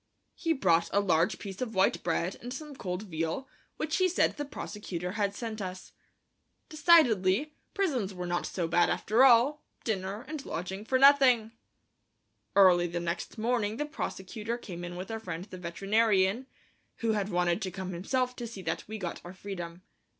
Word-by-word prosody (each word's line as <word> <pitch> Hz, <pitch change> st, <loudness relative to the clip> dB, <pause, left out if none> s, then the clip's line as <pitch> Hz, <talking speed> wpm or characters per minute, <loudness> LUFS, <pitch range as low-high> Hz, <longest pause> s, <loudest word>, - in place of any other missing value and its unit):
He 330 Hz, -1 st, 0 dB
brought 175 Hz, -, +2 dB
a 200 Hz, -, +3 dB
large 180 Hz, 0 st, +2 dB
piece 195 Hz, 0 st, -8 dB
of 230 Hz, -3 st, -3 dB
white 190 Hz, +1 st, +3 dB
bread 170 Hz, +2 st, -1 dB
and 245 Hz, -, -7 dB
some 295 Hz, +2 st, -7 dB
cold 180 Hz, -3 st, -4 dB
veal, 165 Hz, +6 st, -3 dB, 0.3 s
which 310 Hz, 0 st, -1 dB
he 370 Hz, -1 st, +3 dB
said 355 Hz, -, +2 dB
the 290 Hz, -, -4 dB
prosecutor 180 Hz, -9 st, -5 dB
had 200 Hz, 0 st, -1 dB
sent 220 Hz, -2 st, -5 dB
us. 185 Hz, -1 st, -6 dB, 0.8 s
Decidedly, 295 Hz, -, +4 dB, 0.2 s
prisons 275 Hz, -, 0 dB
were 180 Hz, -2 st, -5 dB
not 175 Hz, 0 st, -1 dB
so 175 Hz, -3 st, -2 dB
bad 175 Hz, +1 st, +3 dB
after 230 Hz, +5 st, +3 dB
all; 270 Hz, +4 st, +5 dB, 0.2 s
dinner 205 Hz, +2 st, -3 dB
and 305 Hz, -2 st, -5 dB
lodging 190 Hz, +2 st, -5 dB
for 260 Hz, -, +2 dB
nothing! 260 Hz, -5 st, +6 dB, 1.0 s
Early 180 Hz, -3 st, +6 dB
the 175 Hz, 0 st, -3 dB
next 170 Hz, +5 st, -4 dB
morning 225 Hz, -1 st, 0 dB
the 295 Hz, -, -1 dB
prosecutor 220 Hz, -4 st, -4 dB
came 175 Hz, -7 st, -8 dB
in 175 Hz, 0 st, -6 dB
with 185 Hz, +4 st, -6 dB
our 225 Hz, -, -3 dB
friend 180 Hz, -4 st, -6 dB
the 185 Hz, -3 st, -10 dB
veterinarian, 195 Hz, +5 st, +1 dB, 0.5 s
who 230 Hz, -1 st, +2 dB
had 205 Hz, -2 st, -1 dB
wanted 175 Hz, +1 st, +1 dB
to 190 Hz, -, -2 dB
come 185 Hz, 0 st, -5 dB
himself 250 Hz, +8 st, -1 dB
to 240 Hz, -, -4 dB
see 205 Hz, -5 st, -9 dB
that 160 Hz, -1 st, -2 dB
we 220 Hz, +1 st, -5 dB
got 180 Hz, -5 st, -5 dB
our 175 Hz, +2 st, -9 dB
freedom. 180 Hz, -3 st, -7 dB
200 Hz, 175 wpm, -30 LUFS, 180-245 Hz, 1.0 s, nothing